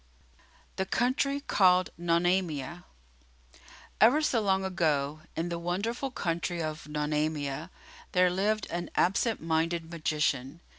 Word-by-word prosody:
The 190 - -1
Country 275 +5 +1
Called 185 -7 +3
Nonamia 175 -2 0 1.2
Ever 245 +8 +7
so 240 -6 +2
long 190 -2 +1
ago, 155 -5 0
in 165 +2 -2
the 170 -1 -3
wonderful 205 +10 -2
country 170 -6 -2
of 155 -1 -4
Nonamia, 150 0 -2 0.4
there 180 -1 +4
lived 205 +3 0
an 175 0 -3
absent 200 +2 +1
minded 165 +1 0
magician. 150 -2 -1
175 Hz, 110 wpm, -29 LUFS, 155-190 Hz, 1.2 s, Ever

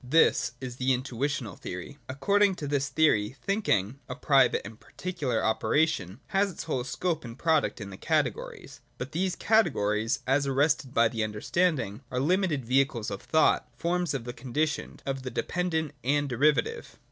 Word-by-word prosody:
This 155 +6 +3
is 125 -2 -6
the 130 0 +2
Intuitional 130 -3 -2
theory. 90 0 -6
62.] 145 - -15
According 200 +9 +2
to 150 -4 -5
this 140 -1 0
theory, 130 -7 +2
thinking, 140 - 0
a 125 - -4
private 135 -3 +3
and 110 +1 -10
particular 160 -11 -3
operation, 110 - +1
has 200 0 +2
its 180 - -7
whole 130 -6 -2
scope 160 +6 -2
and 120 0 -9
product 160 -5 +1
in 100 -2 -7
the 95 - -9
Categories. - - -2 0.2
But, 130 +3 -6
these 180 +3 -1
Categories, 115 - +2
as 140 +2 +2
arrested 140 0 +1
by 115 0 +5
the 110 0 -2
understanding, 110 - 0
are 125 - -2
limited 160 -2 +1
vehicles 125 -3 +1
of 100 - -5
thought, 155 -4 +2
forms 175 -1 0
of 130 - -3
the 120 +1 -6
conditioned, 145 +5 -3
of 135 -1 -2
the 130 - -5
dependent 160 0 -2
and 145 +3 +1
derivative. 135 0 +1
135 Hz, 165 wpm, -28 LUFS, 120-160 Hz, 0.2 s, by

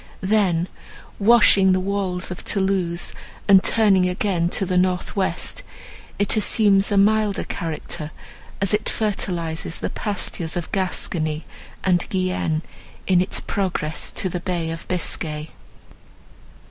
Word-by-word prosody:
Then, 190 -4 +2 0.5
washing 200 -3 +6
the 185 - +2
walls 185 -2 -2
of 180 - -5
Thoulouse, 190 -4 -1 0.3
and 195 -2 +7
turning 195 -5 +4
again 180 -2 0
to 195 - 0
the 185 - -1
north 180 0 +1
west, 195 - -1 0.6
it 205 +2 +3
assumes 205 -2 +3
a 200 - +2
milder 210 0 +3
character, 160 -1 -4 0.5
as 200 +1 +2
it 210 - +1
fertilizes 170 -6 -2
the - - -4
pastures 180 -4 -2
of 175 - -5
Gascony 160 -5 -1 0.4
and 180 -2 +2
Guienne, 185 -4 -1 0.4
in 180 -2 +4
its 185 - 0
progress 180 -6 -2
to - - -1
the 180 -1 -3
Bay 170 -2 -2
of 165 0 -7
Biscay. 155 -3 -3
185 Hz, 125 wpm, -22 LUFS, 170-200 Hz, 0.6 s, and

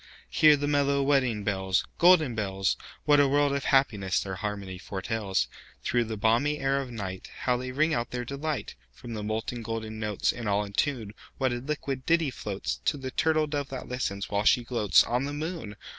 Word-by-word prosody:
Hear 150 -1 +6
the 145 +1 -2
mellow 140 -1 +2
wedding 130 -7 +2
bells, 95 -2 0
Golden 170 -7 +6
bells! 95 -3 0 0.3
What 145 -1 +5
a 145 - +5
world 145 +1 +2
of 140 - -2
happiness 105 -9 +2
their 95 - -4
harmony 100 -1 -5
foretells! 100 +1 -2 0.4
Through 120 -1 +1
the 110 -1 -4
balmy 115 +8 +2
air 135 0 +1
of 130 - -7
nightHow 110 +3 -3
they 130 0 -5
ring 155 +5 +2
out 120 0 -1
their 125 0 -4
delight! 145 +3 -3 0.2
From 120 -2 -9
the 110 - -4
molten 110 +3 -3
golden 110 -1 -5
notes, 105 -2 0
And 115 -3 -4
all 100 +1 +2
in 100 - -10
tune, 115 -4 -1 0.2
What 130 -2 +1
a - - -2
liquid 135 0 -3
ditty 165 -4 +3
floatsTo 105 +7 -3
the 130 -1 -5
turtle 155 +2 +2
dove 145 -2 -3
that 130 -1 -6
listens, 100 -6 -2
while 100 0 0
she 120 +2 +4
gloatsOn 120 +2 +3
the 145 - -4
moon! 155 - -5
125 Hz, 190 wpm, -28 LUFS, 105-140 Hz, 0.4 s, Hear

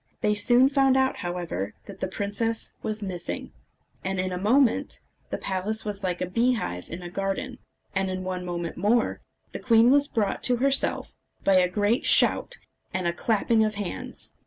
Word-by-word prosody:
They 210 - +2
soon 240 +5 +5
found 270 -1 +3
out, 265 0 +2
however, 175 - -4
that 195 -1 -11
the - - -1
princess 210 +4 -2
was 215 0 -3
missing, 180 -3 -4 0.5
and 190 0 -2
in 185 0 -1
a 180 - -2
moment 235 +5 +2 0.3
the - - -2
palace 210 +4 -2
was 205 -1 -5
like 180 -2 -2
a - - +1
beehive 220 - -1
in 175 +2 -7
a 175 - -6
garden; 200 +8 -3 0.3
and 190 0 0
in 185 0 -3
one 185 -1 -3
minute 175 -1 -4
more 220 +5 +1 0.3
the - - -6
queen 230 0 +5
was 285 +1 +4
brought 210 -6 -1
to 250 - +3
herself 275 +2 0 0.3
by 195 - +4
a 180 -1 +4
great 205 +6 +1
shout 485 - +4 0.3
and 185 -1 -2
a 170 - +1
clapping 220 +3 +2
of 215 -1 -1
hands. 200 -3 -5
205 Hz, 180 wpm, -26 LUFS, 185-235 Hz, 0.5 s, soon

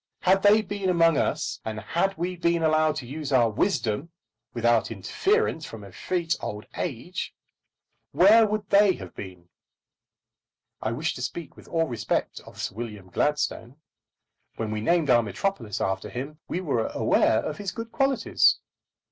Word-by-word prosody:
Had 190 +1 +4
they 210 +2 +5
been 200 -2 -2
among 165 -3 +4
us, - - -1
and 110 -1 -4
had 180 - -1
we 180 +2 -2
been 170 -1 +1
allowed 155 -1 +3
to 135 - -5
use 145 +3 -5
our 120 -4 +4
wisdom 120 - 0 0.4
without 120 -1 +2
interference 160 - 0
from 115 -7 -8
effete 165 - -2
old 105 0 -5
age, - - -4 0.8
where 210 +8 +6
would 210 -1 -2
they 200 -1 +6
have - - -9
been? 90 -3 -10 1.3
I 110 - -1
wish 150 +7 -1
to - - -8
speak 135 +5 -5
with - - -15
all 165 -1 +1
respect 120 -5 -2
of - - -13
Sir - - -3
William 105 -4 -7
Gladstone. 145 -4 -1 0.8
When 110 -1 -3
we 105 0 -2
named 165 +1 +2
our 120 -1 +6
metropolis 115 - -3
after 95 0 -2
him, 140 +5 -6
we 180 - -2
were 130 -10 0
aware - - +2
of - - -4
his 200 -3 -3
good 230 +2 -7
qualities. 270 -4 +3
155 Hz, 155 wpm, -26 LUFS, 115-185 Hz, 1.3 s, where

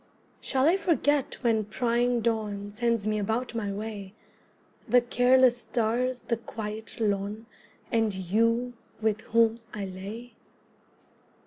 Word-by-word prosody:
Shall 265 -1 0
I 350 +4 +5
forget 295 -7 +1
when 225 -2 +3
prying 240 +2 +1
dawn 210 -3 -2
Sends 230 -1 0
me 215 0 0
about 225 +5 -1
my 215 -4 -2
way, 205 -1 -6 0.7
The 245 +2 +6
careless 245 +1 +4
stars, 245 +2 -1
the 235 - -1
quiet 220 -1 -7
lawn, 205 +1 -1 0.5
And 225 -2 +2
you 230 +6 +1 0.3
with 220 -1 0
whom 230 0 +2 0.2
I 205 -1 -3
lay? 205 +6 -8
225 Hz, 120 wpm, -28 LUFS, 210-245 Hz, 0.7 s, The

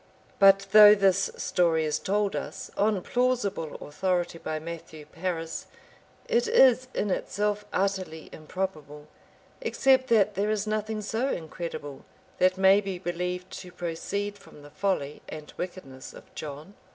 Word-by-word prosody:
But 195 0 +6
though 210 0 +10
this 195 -1 +2
story 165 -3 +1
is 155 0 -1
told 205 0 0
us, - - -6
on 210 -1 +2
plausible 240 -10 -1
authority, 175 +2 -2
by 155 - -3
Matthew 160 -1 -8
Paris,* 165 0 -4 0.6
it 475 0 +2
is 260 - +5
in 205 - 0
itself 210 +2 -1
utterly 185 -4 -2
improbable; 155 -3 -5 0.6
except 265 - +3
that 210 -4 +3
there 205 +2 -1
is 215 -1 0
nothing 215 0 -2
so 225 +6 -1
incredible 160 - -6 0.4
but 185 0 +3
may 190 +1 +6
be 195 -2 -4
believed 180 +1 -4
to 180 - -10
proceed 195 +4 -4
from 145 - -16
the 145 - -13
folly 165 -8 -2
and 155 -1 -9
wickedness 135 -8 -7
of - - -15
John. 150 +5 -8
190 Hz, 140 wpm, -27 LUFS, 165-210 Hz, 0.6 s, though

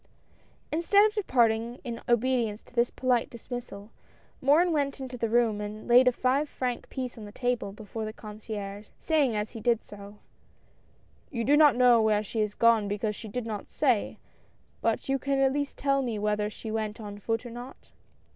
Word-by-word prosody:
Instead 370 +6 +4
of 430 - +1
departing 235 - +1
in 235 -3 -5
obedience 240 -3 +1
to - - -21
this 240 0 +2
polite 250 -2 0
dis 235 +1 -13
missal, 225 -4 -6 0.5
Morin 315 +6 +4
went 285 -3 0
into 260 -1 -6
the 230 -2 -2
room 225 -2 +2
and 210 +1 -7
laid 250 +2 +6
a - - +7
five 265 +4 0
franc 250 -2 -3
piece 255 -3 -5
on 215 - -8
the 205 - -10
table 245 -3 -2
before 215 +2 -7
the 215 - -4
concierge, 210 -2 -7
saying 290 -8 +1
as 210 0 -2
he 230 - -8
did 235 0 +1
so: 205 0 -11 0.6
" - - -36 0.3
You 235 -3 -3
do 280 +5 +4
not 295 -4 +6
know 245 -2 +5
where 215 -1 +2
she 220 +2 -4
has 210 -1 0
gone 230 -3 +4
because 210 +1 -2
she 220 - -9
did 235 +3 -4
not 215 -3 -5
say, 250 -8 +1 0.6
but - - 0
you 270 0 +1
can 275 +1 0
at 270 0 +3
least 285 0 -3
tell 275 0 +1
me 235 -4 -2
whether 210 0 0
she 220 +1 -8
went 215 -1 -3
on 205 -2 -8
foot 225 +3 -2
or 240 - -7
not? 245 +3 -10
235 Hz, 195 wpm, -28 LUFS, 215-260 Hz, 0.6 s, a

